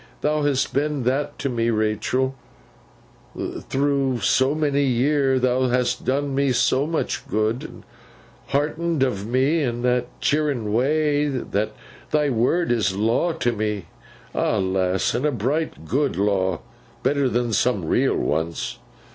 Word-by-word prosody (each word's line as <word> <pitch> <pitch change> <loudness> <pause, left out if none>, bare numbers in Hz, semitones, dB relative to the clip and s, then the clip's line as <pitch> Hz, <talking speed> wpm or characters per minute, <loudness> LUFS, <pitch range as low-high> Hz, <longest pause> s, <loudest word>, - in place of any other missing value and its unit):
Thou 150 0 +1
hast 145 -2 0
been 145 -1 0
that 135 +4 -1
to 140 - -2
me, 115 -3 0
Rachael, 110 +4 0 1.3
through 135 -3 0
so 130 +7 +3
many 145 -2 +1
year: 135 +1 +2
thou 130 0 +2
hast 125 0 0
done 140 +1 0
me 140 -1 +2
so 135 +3 +2
much 160 -1 -2
good, 110 +3 0
and - - -11 0.6
heartened 155 +2 0
of 105 -6 -1
me 135 +7 +2
in 120 -3 -2
that 125 0 +1
cheering 140 -8 0
way, 150 +4 +2
that 115 -6 -2 0.4
thy 150 -2 +2
word 130 +9 +1
is 105 -5 +1
a - - -6
law 115 +11 +2
to 155 -7 0
me. 105 -4 -2 0.5
Ah, 110 - +1
lass, 95 -1 0
and 125 - -1
a 150 - +2
bright 135 - -2
good 135 - 0
law! 95 -3 +1 0.4
Better 140 -2 +2
than 120 -1 0
some 105 -5 +1
real - - +2
ones. 80 +2 -2
130 Hz, 145 wpm, -23 LUFS, 110-145 Hz, 1.3 s, so